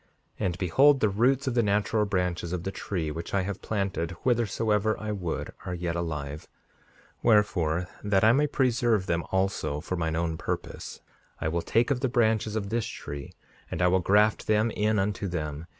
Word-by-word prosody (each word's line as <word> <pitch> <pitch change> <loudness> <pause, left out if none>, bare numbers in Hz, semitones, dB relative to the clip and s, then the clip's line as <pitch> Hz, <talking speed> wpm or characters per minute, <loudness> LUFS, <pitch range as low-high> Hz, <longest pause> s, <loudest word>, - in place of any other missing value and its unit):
5:54 - - -37 0.4
And, 90 -1 -3
behold, 135 - +4
the 110 - +3
roots 125 +7 +2
of 130 - 0
the 120 - +3
natural 105 +1 +1
branches 90 -3 -1
of 90 -2 -3
the 95 - -3
tree 85 -6 -3
which 85 +5 -5
I 95 - +2 0.2
planted 95 -5 -2
whithersoever 110 -3 +1
I 110 0 -3
would 90 -5 -3 0.2
are 90 - -2
yet 85 -1 -3
alive; 75 -3 -4 0.7
wherefore, 90 -6 +2 0.2
that 100 -1 +2
I 110 - +7
may 145 +4 +3
preserve 120 -7 +1
them 85 -2 0
also 95 -6 0
for 90 +4 -4
mine 80 -2 -1
own 80 -1 -1
purpose, - - -5 0.4
I 80 - -1
will 85 +1 -1
take 115 +9 +1
of 130 - +1
the 130 0 0
branches 110 -2 +1
of 100 -2 -2
this 115 0 -1
tree, 70 -1 -7 0.4
and - - -4
I 90 0 +4
will 95 +1 +3
graft 105 +4 +3
them 110 +1 +2
in 105 +1 +1
unto 100 0 -1
them. 80 -2 -4
100 Hz, 185 wpm, -27 LUFS, 85-110 Hz, 0.7 s, I